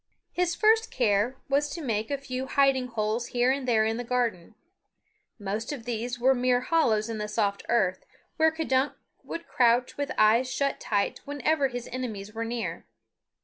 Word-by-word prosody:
His 355 -1 0
first 445 +1 +3
care 225 +1 +1
was 285 +2 +1
to 335 - -6
make 220 -4 -1
a 285 - -1
few 260 -1 -5
hiding 270 -2 +2
holes 230 0 -2
here 245 +1 +2
and 270 -1 -2
there 220 -3 +3
in 225 +1 0
the 245 - -3
garden. 230 -6 -2 0.8
Most 210 +3 -4
of 260 -6 -6
these 240 +1 -3
were 260 +2 +4
mere 250 -1 +2
hollows 240 -7 +2
in 225 -2 -4
the 210 - -3
soft 205 -2 -1
earth, 190 -6 +1 0.3
where 320 0 +4
K'dunk 295 -4 0 0.3
would 335 - -7
crouch 245 0 +2
with 285 0 -2
eyes 230 +4 +4
shut 275 +1 -1
tight 200 -2 -1
whenever 285 +1 +1
his 245 -2 -6
enemies 215 -5 -5
were 225 +1 -3
near. 235 0 -4
245 Hz, 175 wpm, -27 LUFS, 220-275 Hz, 0.8 s, were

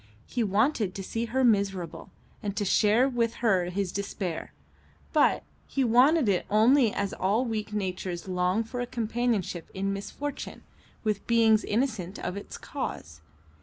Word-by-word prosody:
He 245 - -1
wanted 210 -1 +1
to 195 - -5
see 225 +4 -2
her 260 +3 0
miserable, 195 -7 +1 0.3
and 205 -1 -4
to 205 - 0
share 215 +6 +4
with 235 -3 0
her 190 -5 +3
his 180 +1 -2
despair; 190 -4 -4 0.6
but - - +3 0.2
he 270 - 0
wanted 255 +4 +5
it 190 -3 +1
only 230 +3 +5
as 200 -1 -2
all 210 +7 +1
weak 220 -2 -3
natures 185 -3 -3
long 180 +3 +1
for 245 +3 -6
a 245 - -3
companionship 230 -7 -1
in 195 +1 -1
misfortune 275 +8 -6 0.4
with 210 -2 -1
beings 225 -2 +4
innocent 215 -5 -1
of 180 - -4
its 200 - -7
cause. 80 0 -6
210 Hz, 150 wpm, -28 LUFS, 190-235 Hz, 0.6 s, wanted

